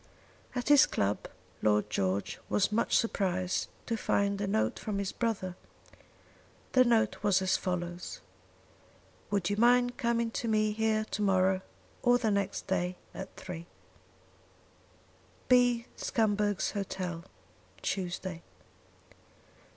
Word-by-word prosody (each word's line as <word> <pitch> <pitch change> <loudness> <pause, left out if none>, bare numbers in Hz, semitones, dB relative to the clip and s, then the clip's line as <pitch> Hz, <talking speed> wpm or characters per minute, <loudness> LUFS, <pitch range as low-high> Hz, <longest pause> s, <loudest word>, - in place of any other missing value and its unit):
At 250 +2 -2
his 290 -2 +8
club 100 +1 -1 0.3
Lord 105 0 +3
George 95 +1 -1
was 205 0 +2
much 225 +2 +2
surprised 185 -5 0 0.2
to 230 - -1
find 200 -2 0
a 200 - -1
note 215 +3 0
from 210 -2 -3
his 200 -1 -2
brother. 200 -6 -2 1.2
The 255 - +6
note 230 -3 +2
was 205 -3 +3
as 190 0 +2
follows: 175 -1 -3 1.1
"Would 200 -3 0
you 205 - -1
mind 245 +2 +4
coming 235 -1 0
to 230 - -3
me 215 -1 +2
here 215 0 +1
to - - -2
morrow 190 -1 +3 0.4
or 245 0 +5
the 225 -3 0
next 200 -1 -1
day 180 -1 -1 0.2
at 190 0 -8
3. 170 -2 -7 1.8
"B. 245 -2 +4
Scumberg's 205 -3 0
Hotel, 185 -4 -4 0.6
Tuesday." 180 -2 -3
200 Hz, 120 wpm, -30 LUFS, 185-225 Hz, 1.8 s, his